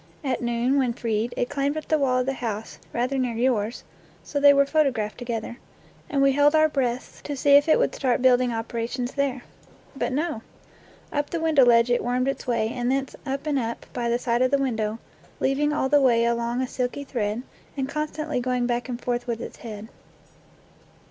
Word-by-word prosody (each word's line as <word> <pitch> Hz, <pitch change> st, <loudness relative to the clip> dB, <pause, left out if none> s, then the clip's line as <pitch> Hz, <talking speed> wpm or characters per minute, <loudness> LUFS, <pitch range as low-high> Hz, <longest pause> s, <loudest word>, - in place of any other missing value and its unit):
At 265 Hz, -3 st, -1 dB
noon, 240 Hz, +3 st, +1 dB
when 250 Hz, -3 st, +1 dB
freed, 230 Hz, 0 st, -1 dB
it 245 Hz, -, 0 dB
climbed 280 Hz, +3 st, -1 dB
up 310 Hz, -, -5 dB
the 310 Hz, -, +2 dB
wall 260 Hz, -2 st, +2 dB
of -, -, -2 dB
the 270 Hz, -, -1 dB
house 225 Hz, -4 st, -5 dB
rather 255 Hz, +3 st, -1 dB
near 250 Hz, -3 st, -1 dB
yours 235 Hz, -2 st, 0 dB, 0.4 s
(so 285 Hz, -, -3 dB
they 285 Hz, 0 st, +8 dB
were 280 Hz, 0 st, +4 dB
photographed 270 Hz, -9 st, 0 dB
together), 235 Hz, -1 st, -4 dB, 0.5 s
and 280 Hz, -4 st, +2 dB
we 275 Hz, -, +5 dB
held 290 Hz, +2 st, +4 dB
our 310 Hz, 0 st, +5 dB
breaths 255 Hz, -4 st, -2 dB
to 290 Hz, -, -5 dB
see 285 Hz, +2 st, +2 dB
if 285 Hz, +2 st, +6 dB
it -, -, +6 dB
would -, -, +1 dB
start 255 Hz, -3 st, 0 dB
building 250 Hz, -1 st, +4 dB
operations 235 Hz, +2 st, -3 dB
there. 270 Hz, -3 st, -1 dB, 0.5 s
But 270 Hz, -, -2 dB
no. 295 Hz, -3 st, -2 dB, 0.7 s
Up 290 Hz, 0 st, -1 dB
the 335 Hz, -, -2 dB
window 320 Hz, -4 st, +4 dB
ledge 235 Hz, 0 st, +5 dB
it 240 Hz, -, +2 dB
wormed 250 Hz, +2 st, 0 dB
its 275 Hz, -, -3 dB
way, 230 Hz, -3 st, +1 dB
and 245 Hz, +1 st, -1 dB
thence 270 Hz, 0 st, -1 dB
up 275 Hz, +2 st, -3 dB
and 290 Hz, -3 st, +1 dB
up, 230 Hz, -1 st, -4 dB
by 240 Hz, -1 st, -1 dB
the 235 Hz, -, +2 dB
side 240 Hz, 0 st, 0 dB
of 255 Hz, -, +4 dB
the 280 Hz, -, +3 dB
window, 225 Hz, -5 st, -1 dB, 0.4 s
leaving 285 Hz, +3 st, +1 dB
all 295 Hz, -3 st, 0 dB
the 290 Hz, +1 st, +4 dB
way 235 Hz, -3 st, +4 dB
along 235 Hz, +1 st, 0 dB
a -, -, -2 dB
silky 250 Hz, +3 st, -3 dB
thread, 230 Hz, -3 st, -2 dB, 0.3 s
and 265 Hz, -1 st, -1 dB
constantly 305 Hz, 0 st, -3 dB
going 250 Hz, 0 st, 0 dB
back 240 Hz, +1 st, -2 dB
and 240 Hz, -1 st, -4 dB
forth 245 Hz, 0 st, -2 dB
with 230 Hz, -1 st, -2 dB
its -, -, -8 dB
head. 215 Hz, -2 st, -8 dB
255 Hz, 205 wpm, -25 LUFS, 235-280 Hz, 0.7 s, they